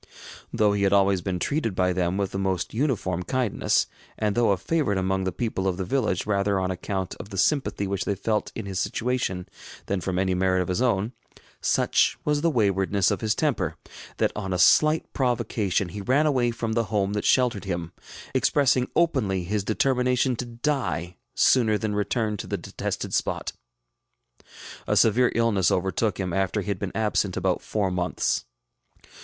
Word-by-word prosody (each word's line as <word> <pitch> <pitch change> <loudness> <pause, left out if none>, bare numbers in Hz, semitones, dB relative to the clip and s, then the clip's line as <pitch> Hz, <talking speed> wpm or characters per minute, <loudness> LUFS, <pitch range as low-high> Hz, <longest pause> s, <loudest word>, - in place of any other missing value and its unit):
Though 105 -1 +2
he 100 - -1
had 100 0 +3
always 100 -2 +3
been 90 0 -2
treated 115 - -1
by 90 0 +2
them 90 0 0
with 100 -1 -1
the 95 - -3
most 95 -2 -1
uniform 110 - -1
kindness, 120 +4 +1 0.3
and 105 -1 0
though 120 -2 +3
a 100 - +3
favorite 135 - 0
among 95 0 0
the 95 - 0
people 95 -1 -2
of 90 -2 0
the 95 - -3
village 105 -4 0
rather 100 -1 +1
on 95 0 -1
account 95 0 -3
of - - -8
the 100 - -7
sympathy 135 -2 +1
which 100 0 -2
they 100 - 0
felt 105 +2 -1
in 110 - -5
his 95 -1 -3
situation 115 -7 -2 0.4
than 100 -2 -2
from 90 0 -2
any 95 0 +1
merit 95 0 +2
of 90 - -8
his 90 +6 0
own, 115 -2 +1 0.5
such - - +2
was 150 -1 +1
the 165 - +3
waywardness 100 - +2
of - - -2
his 110 -1 +1
temper, 100 - 0 0.4
that - - +1
on 95 -1 -3
a - - 0
slight 155 - +5
provocation 105 -7 0
he 100 +3 -6
ran 130 +9 +2
away 130 -5 +2
from 115 -1 -3
the 115 0 +1
home 100 -1 0
that 105 - -2
sheltered 125 -6 +2
him, 85 -3 -3 0.4
expressing 130 -3 +2
openly 115 - +1
his 100 +3 -1
determination 125 +3 +1
to 125 - -4
die 120 - -2 0.2
sooner 110 -5 +4
than 105 +1 -2
return 105 +1 -1
to - - -6
the - - -2
detested - - -5
spot. - - -1 1.3
A - - +1
severe 120 +3 +4
illness 110 -7 +2
overtook 95 +4 0
him 90 -3 -2
after 95 +2 0
he 105 - -6
had 100 -3 -2
been 100 -3 -3
absent 105 -3 0
about 95 -1 0
four 100 -3 -1
months. 90 0 -1
100 Hz, 185 wpm, -25 LUFS, 95-120 Hz, 1.3 s, slight